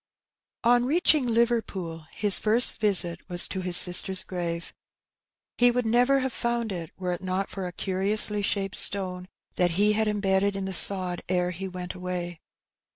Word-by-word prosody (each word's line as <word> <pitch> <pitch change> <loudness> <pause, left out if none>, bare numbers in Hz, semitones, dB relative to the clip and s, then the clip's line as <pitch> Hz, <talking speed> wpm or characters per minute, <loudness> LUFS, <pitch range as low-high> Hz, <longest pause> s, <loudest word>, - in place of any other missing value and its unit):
On 240 +1 +3
reaching 300 -2 +2
Liverpool, 220 -9 -2
his 205 -2 +2
first 225 +3 +1
visit 180 -5 +1
was 175 -1 +2
to 190 - -5
his 180 -1 +4
sister's 185 +1 +5
grave. 170 -2 -6 0.9
He 245 0 +5
would 245 0 -1
never 245 +4 +2
have 260 -2 -3
found 235 -2 -3
it, 170 -4 -6
were 180 -1 -4
it 175 - -5
not 185 +1 -3
for 190 -2 -5
a - - -7
curiously 205 +3 0
shaped 200 0 -2
stone 185 -2 -1 0.3
that 175 -1 0
he 210 +1 +3
had 220 +1 0
embedded 200 -1 0
in 195 -1 -4
the 190 - -5
sod 185 -1 +3
ere 180 -1 0
he 190 +2 -7
went 180 -1 -7
away. 180 -2 -6
190 Hz, 165 wpm, -25 LUFS, 180-220 Hz, 0.9 s, sister's